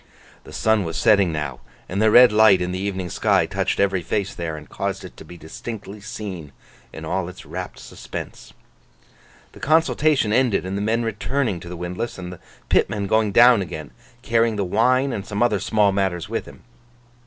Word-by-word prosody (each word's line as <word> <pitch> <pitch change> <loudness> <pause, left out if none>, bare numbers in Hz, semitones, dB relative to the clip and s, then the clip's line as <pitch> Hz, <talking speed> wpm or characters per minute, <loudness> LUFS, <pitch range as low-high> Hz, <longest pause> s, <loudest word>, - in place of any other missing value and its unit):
The - - -12
sun 110 -2 +1
was 80 -2 -4
setting 100 -5 +4
now; 75 -5 -4 0.3
and 95 +3 -2
the 110 - +5
red 120 +2 +8
light 105 -3 +6
in 90 0 -2
the 90 - -3
evening 95 -3 -3
sky - - +2
touched - - -2
every 95 -2 +2
face 100 +4 -2
there, 80 -2 -5
and 75 -1 -11
caused - - -4
it - - -11
to - - -10
be 85 - -12
distinctly 105 +5 -8
seen 95 - -7 0.4
in - - -8
all 95 -2 -2
its 90 - -12
rapt - - -7
suspense. - - -9 1.0
The - - -15
consultation 155 -6 +2
ended 120 -6 +2
in 95 - -4
the 100 - -2
men 115 +3 0
returning 115 -1 -2
to 85 - -10
the 90 - -7
windlass, 90 +7 -5
and 90 -1 -7
the 90 - -12 0.3
pitman 100 -1 +1
going 110 +1 +2
down 120 0 +6
again, 80 -7 -7 0.3
carrying 115 -2 +2
the 100 -2 -1
wine 125 +7 +2
and 100 - -4
some 105 +3 -1
other 110 -4 +2
small 105 -1 +2
matters 95 -4 -1
with - - -4
him. - - -14
100 Hz, 190 wpm, -22 LUFS, 90-110 Hz, 1.0 s, red